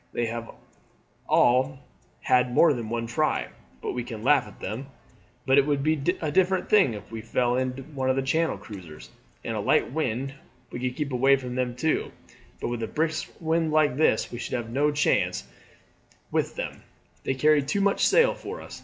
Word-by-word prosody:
They 120 - 0
have 115 0 -5 0.8
all 130 +3 +3 0.4
had 125 0 +3
more 165 -3 +6
than 115 -4 -5
one 115 0 -2
try, 120 +7 0 0.3
but - - -2
we 125 - -3
can 115 -2 -7
laugh 135 -3 +4
at 105 - -14
them; 115 +8 -5 0.6
but 135 +1 +5
it 140 - +2
would 145 -2 +1
be 155 -1 +1 0.2
a 155 -2 -2
different 190 +3 +1
thing 190 - +5
if 105 +1 -10
we 115 -1 -5
fell 120 +2 0
in 130 0 -1
with 135 0 -9
one 135 -3 -2
of 130 - +3
the 135 - 0
Channel 160 +4 +1
cruisers; 90 -8 -11 0.3
in - - -3
a - - -2
light - - +2
wind 135 -2 -2 0.4
we - - -5
could 125 0 -2
keep 150 -2 -3
away 135 +2 +4
from 125 -2 -5
them 125 -1 -1
too, 155 +5 0 0.5
but - - -3
with 120 -1 -3
a 110 - -2
brisk 155 0 -1
wind 160 -1 0
like 155 -4 +3
this 145 -6 +2
we 120 - -6
should - - -3
have 115 -2 -4
no 145 +4 +2
chance 145 0 +1 0.9
with - - -1
them; - - -5 0.4
they 135 - -1
carry 150 +2 +4
too 140 +9 -1
much 200 0 +2
sail - - +5
for - - -7
us. - - -10
130 Hz, 200 wpm, -26 LUFS, 120-150 Hz, 0.9 s, more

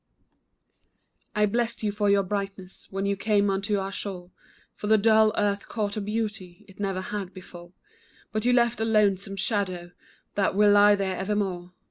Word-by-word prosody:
I 210 0 +4
blessed 235 +2 -1
you 210 - +1
for 205 0 0
your 200 0 +4
brightness 195 -1 -5
When 195 +1 -3
you 200 0 +1
came 205 0 +1
unto 200 +2 0
our 195 0 -3
shore, 185 -3 -6 0.4
For 210 - -6
the 220 +1 +5
dull 220 0 +4
earth 205 -1 0
caught 205 -3 -2
a 215 - -2
beauty 205 -4 -4
It 195 - -18
never 195 -2 -2
had 195 -1 -5
before; 175 -1 -12 0.6
But 215 0 -2
you 245 - +3
left 240 -1 +2
a - - 0
lonesome 200 -3 +1
shadow, 190 -3 -2 0.4
That 195 -2 0
will 205 0 +5
lie 205 0 +6
there 195 -2 -2
evermore. 190 -3 -2
200 Hz, 170 wpm, -26 LUFS, 190-210 Hz, 0.6 s, lie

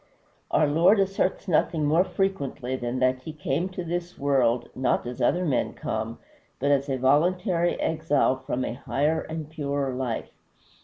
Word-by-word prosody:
Our 155 - +3
Lord 170 +8 +4
asserts 195 0 0
nothing 160 -2 +2
more 160 +5 +4
frequently 140 -11 -2
than 120 0 -3
that 130 0 +2
he 160 - -7
came 155 +4 -1
to 185 -1 -5
this 175 +1 -4
world, 130 -4 +2
not 130 -1 0
as 125 0 -6
other 180 +1 +2
men 135 -6 0
come, - - -3 0.4
but 140 +2 +1
as 140 0 +2
a 135 - 0
voluntary 175 - +2
exile 155 -4 +1
from 130 -1 -3
a - - -3
higher 150 +6 0
and 160 -1 -6
purer 140 -3 -2
life. 125 -3 -3
145 Hz, 160 wpm, -26 LUFS, 130-170 Hz, 0.4 s, Lord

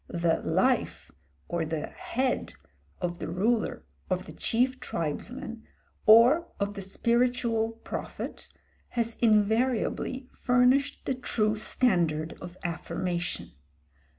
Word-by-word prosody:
The 170 -1 +1
life - - +1 0.4
or 170 -1 -1
the 160 -1 -2
head 260 +1 -2 0.5
of 175 -1 -3
the - - -4
ruler 215 +7 0 0.2
of - - -1
the - - -9
chief 255 +2 0
tribesman, 225 - -4 0.4
or 240 +10 +7
of 200 0 -1
the 200 - -6
spiritual 235 +2 +1
prophet, - - -6 0.5
has 230 -1 0
invariably 235 +4 +2
furnished 250 +3 +2
the - - +1
true 220 -4 0
standard 170 -9 +1
of 175 +1 -9
affirmation. 175 0 -3
220 Hz, 105 wpm, -28 LUFS, 175-245 Hz, 0.5 s, or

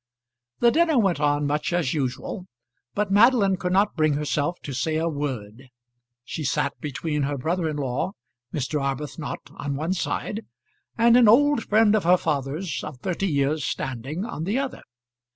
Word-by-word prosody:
The 235 - +6
dinner 325 -1 +3
went 195 -9 +2
on 145 0 +2
much 150 +3 -1
as 170 -6 0
usual, 145 +6 -3 0.5
but 205 -1 0
Madeline 205 -2 +5
could 180 0 -3
not 200 +3 +2
bring 155 -2 +2
herself 150 +3 -1
to 140 - -5
say 130 +5 -1
a 160 +1 +1
word. 130 -5 -4 0.6
She 160 - -5
sat - - -1
between 150 +1 -2
her 140 0 -1
brother 165 +5 -1
in 150 - -3
law, 135 +6 -2 0.4
Mr. 145 +1 -2
Arbuthnot, 140 +2 -4
on 140 -1 -4
one 160 +6 -1
side, 210 +4 -3 0.5
and 235 0 +5
an 245 -2 +7
old 280 +2 +5
friend 215 0 +4
of 215 - +2
her 180 +2 +5
father's, 155 +3 -2
of 150 -4 -7
thirty 190 +1 -1
years' 145 -1 +1
standing, 135 - -3
on 195 -10 -5
the 205 +7 0
other. 275 -1 -3
160 Hz, 170 wpm, -24 LUFS, 145-195 Hz, 0.6 s, an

